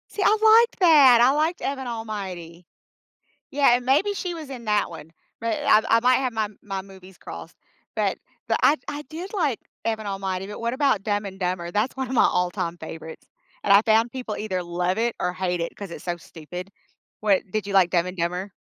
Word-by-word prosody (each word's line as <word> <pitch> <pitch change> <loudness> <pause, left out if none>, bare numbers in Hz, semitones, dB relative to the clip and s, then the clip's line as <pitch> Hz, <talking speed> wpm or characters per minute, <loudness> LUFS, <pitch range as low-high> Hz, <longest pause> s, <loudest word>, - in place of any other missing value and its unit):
See, 415 - -4
I - - +5 0.4
liked 470 - -25
that, 285 -9 +7
I 250 +2 +6
liked 310 +4 0
Evan 265 -2 -3
Almighty. 190 -7 -6 0.9
Yeah, 275 -3 +4
and 245 0 -3
maybe 300 +11 +3
she 365 -3 -4
was 315 -4 -8
in 255 -3 -8
that 210 -1 +1
one, 160 -2 -11 0.3
but 230 -1 -1
I've 215 +1 +5
I 230 - +5
might 250 +2 +4
have 260 -1 0
my 220 -2 -1 0.2
my 195 -2 -4
movies 190 -1 -15
crossed, - - -10 0.4
but - - 0 0.3
but - - +2
I 300 - +5
I 290 0 -4
did 350 +6 -7
like 295 - 0 0.2
Evan 220 -2 -2
Almighty, 195 -1 -3
but 210 +2 -8
what 235 +1 -1
about 265 -7 +1
Dumb 205 -1 -1
and 190 -1 -7
Dumber? 180 -2 -2
That's 215 +8 -1
one 265 -1 -2
of 260 - -5
my 245 - +5
all-time 175 -1 0
favorites, 160 0 -9 0.4
and 200 - +5
I 200 - +8
found 225 +1 +3
people 250 -5 -5
either 190 -4 -3
love 175 +2 -1
it, 235 +1 0
or 180 - -1
hate 180 -1 -2
it, 170 - -4
'cause 200 -4 -8
it's - - -9
so 175 -1 -1
stupid. 175 +3 -9 0.5
What 205 -3 +3
did 215 -1 -2
you 200 - -4
like 190 -3 +5
Dumb 175 -1 +2
and 180 0 -6
Dumber? 180 +3 -2
210 Hz, 210 wpm, -24 LUFS, 180-255 Hz, 0.9 s, I